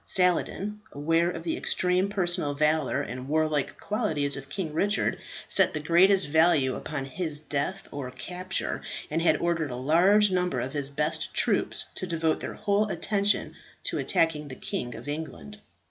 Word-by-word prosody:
Saladin, 190 +3 +1
aware 165 +4 +1
of 165 -2 -6
the 165 - -1
extreme 180 +2 +1
personal 175 -7 0
valour 150 0 +1
and 125 +3 -7
warlike 155 -1 0
qualities 160 - +1
of 135 0 -8
King 160 0 -4
Richard, 205 +6 +1 0.3
set - - +3
the - - -1
greatest 185 +5 +4
value 155 -4 +3
upon 145 -3 -5
his 155 +2 -1
death 155 +6 -2
or 140 -3 -5
capture, 180 +9 -4 0.3
and 160 +2 0
had 170 - +3
ordered 165 -3 -1
a 125 - -5
large 180 +10 +4
number 180 -1 0
of 130 - -4
his 140 -2 -3
best 150 +2 -2
troops - - +2
to 185 - -4
devote 165 -2 0
their - - -6
whole 205 +1 +1
attention 200 +3 +1 0.3
to - - -1
attacking 155 -2 +1
the 130 - -8
King 120 -1 -4
of - - -10
England. 145 - -6
160 Hz, 160 wpm, -27 LUFS, 145-185 Hz, 0.3 s, greatest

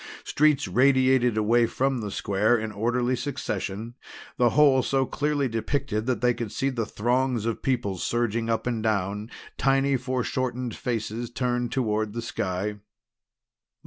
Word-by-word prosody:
Streets 150 -4 +2
radiated 130 +1 +3
away 115 +2 +3
from 135 +1 0
the 105 - -4
square 105 +4 +1
in 110 0 -4
orderly 120 +4 0
succession, 115 -5 -4 0.4
the 120 -2 +4
whole 140 -1 +5
so 135 +1 +1
clearly 145 0 0
depicted 115 0 -2
that 125 -4 0
they 125 0 +3
could 115 -3 -5
see 135 - 0
the 115 -4 -2
throngs 125 0 0
of 115 -1 -2
people 120 -8 -1
surging 115 +1 -1
up 115 - 0
and 120 -2 -1
down, 105 0 -1 0.3
tiny 135 0 +3
foreshortened 125 -1 -2
faces 115 -1 -3
turned 120 0 -1
toward 110 -4 -1
the 115 - -3
sky. 100 -1 -3
120 Hz, 145 wpm, -26 LUFS, 110-130 Hz, 0.4 s, whole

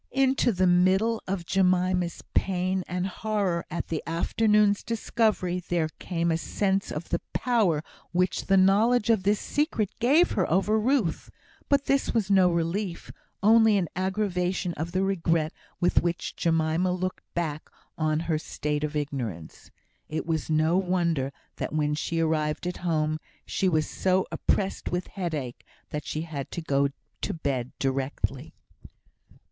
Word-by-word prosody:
Into 265 -2 +2
the 185 -2 +1
middle 190 +6 +3
of 185 -2 -2
Jemima's 180 -1 +1
pain 185 0 0
and 180 0 -2
horror 195 -3 -1
at 170 - -4
the 160 - -2
afternoon's 210 +4 +2
discovery, 215 -5 0
there 170 -3 -1
came 170 -2 -1
a 160 - +2
sense 195 +2 -1
of 150 +3 -5
the 170 - -1
power 205 -12 +2 0.3
which 180 +1 0
the 195 - +4
knowledge 210 +5 +4
of 220 -4 +3
this 205 +2 +2
secret 290 - -1
gave 285 +9 +4
her 185 - 0
over 200 +5 +2
Ruth; 225 - 0 0.4
but 280 -1 +3
this 275 -3 +1
was 205 -3 +1
no 190 -2 +6
relief, 170 +2 -2 0.3
only 220 0 +6
an 180 -3 0
aggravation 185 -2 -1
of 160 +2 -4
the 185 +2 +1
regret 165 -5 +1 0.3
with 175 -1 +3
which 175 0 -2
Jemima 165 +2 +1
looked 185 0 -3
back 155 -3 -3 0.3
on 155 0 0
her 160 -2 0
state 150 -1 -3
of 150 0 -2
ignorance. 125 - -4 0.4
It 155 - -3
was 160 -1 -2
no 160 +3 +3
wonder 170 -7 0 0.3
that - - -4
when 150 -1 +1
she 165 +2 -2
arrived 155 -1 0
at 180 - -3
home, 155 -3 0 0.3
she 190 - 0
was 155 -3 +1
so 185 0 +1
oppressed 195 -1 -1
with 180 +1 -1
headache 155 - -4 0.3
that 150 0 -4
she 155 - -2
had 150 -5 -5
to 170 - -3
go 140 -2 +2 0.3
to - - -2
bed 135 -6 -2
directly. 135 +1 -2
180 Hz, 150 wpm, -27 LUFS, 160-195 Hz, 0.4 s, no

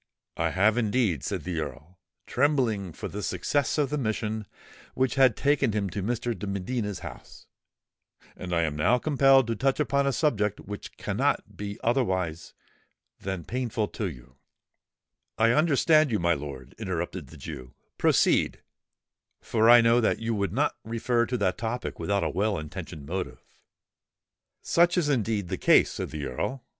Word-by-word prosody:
"I - - 0
have 105 +5 +3
indeed," 105 - +1
said 95 0 -3
the 90 -3 -3
Earl, 80 +3 -7 0.3
trembling 120 - +1
for - - -6
the 105 - -6
success 145 +9 0
of 145 -2 +1
the 150 - 0
mission 110 -3 -2 0.5
which 130 0 +1
had 130 -5 +4
taken 140 -6 +2
him 100 -3 -1
to 100 - -3
Mr. 120 +3 -1
de 100 +2 -6
Medina's 100 0 -3
house; - - -10 0.9
"and 90 - -7
I 85 -1 +2
am 75 -2 -1
now 105 +12 +3
compelled 135 -1 +4
to 115 0 -2
touch 135 +5 0
upon 140 -1 +1
a - - +3
subject 105 -9 0
which 105 0 -8
cannot - - -1
be 100 0 -6
otherwise 95 -9 -1 0.6
than 95 -3 -4
painful 120 -4 -2
to 105 -4 -3
you——" 65 -3 -13 1.0
"I 115 +1 +4
understand 155 +1 +4
you, 110 - +1
my 85 -1 +2
lord," 70 -4 -7
interrupted 90 -5 -4
the - - -13
Jew: 65 -5 -9 0.2
"proceed—for 115 0 0
I 120 0 +9
know 115 +1 +4
that 110 - +2
you 115 0 -2
would 100 -4 -1
not 145 +8 0
refer 115 +1 0
to 125 - -1
that 95 -4 0
topic 120 +2 -4
without 100 -2 0
a 80 - 0
well 100 +4 0
intentioned 80 -1 -7
motive." 90 +4 -5 1.2
"Such 175 +1 +3
is 160 -5 +2
indeed 110 -8 0
the 95 - -3
case," - - +5
said - - -4
the 75 -2 -5
Earl. 120 - -3
105 Hz, 160 wpm, -27 LUFS, 90-125 Hz, 1.2 s, I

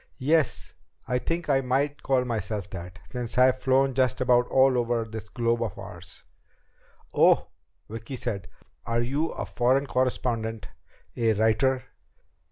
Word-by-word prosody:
"Yes, 155 +3 +1 0.3
I 125 - +1
think 165 +5 -3
I 135 -2 +3
might 140 +3 0
call 130 -2 +1
myself 110 -4 -3
that 90 0 -8
since 125 -2 -4
I've 130 0 +5
flown 135 +1 +2
just 130 -2 +1
about 125 -1 +3
all 130 0 +4
over 120 -1 0
this 110 -1 -8
globe 120 -1 0
of 115 -5 -3
ours." - - -10 0.9
"Oh?" - - +4 0.4
Vicki 115 +4 -7
said. 105 -7 -4 0.4
"Are 115 +1 0
you 140 +6 0
a - - -5
foreign 130 +3 +1
correspondent? 120 -4 -1 0.5
A 115 -2 +2
writer?" 120 +5 +2
125 Hz, 140 wpm, -26 LUFS, 115-130 Hz, 0.9 s, I've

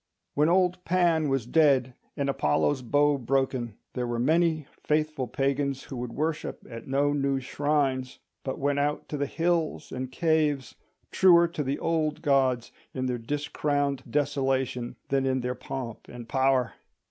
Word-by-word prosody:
When 150 +3 +3
old 180 0 +2
Pan 170 -4 +2
was 135 -4 0
dead 135 -3 +3 0.2
and 140 -1 0
Apollo's 135 - +1
bow 145 +3 +2
broken, 130 -3 -1 0.2
there 125 -1 -2
were 120 0 -2
many 160 +4 +2 0.2
faithful 150 -3 0
pagans 135 +2 -1
who 135 - -8
would 120 -1 -4
worship 155 +2 -3
at 115 -1 -9
no 140 +2 +2
new 140 -1 +1
shrines, 135 -1 -1 0.3
but 130 - -3
went 140 +1 0
out 145 +1 -1
to 150 - -3
the 140 0 -1
hills 165 0 -1
and 130 0 -4
caves, 150 -3 +1 0.4
truer 170 -2 +6
to 170 -3 -4
the 140 0 -1
old 160 -2 -1
gods 130 -5 +2 0.2
in 130 -1 -1
their 125 -1 -1
discrowned 145 +1 -1
desolation 135 -4 0
than 135 -1 +1
in 130 0 +1
their 125 +1 -2
pomp 125 -2 -7
and 120 -1 -9
power. 130 -2 +2
140 Hz, 155 wpm, -27 LUFS, 130-150 Hz, 0.4 s, truer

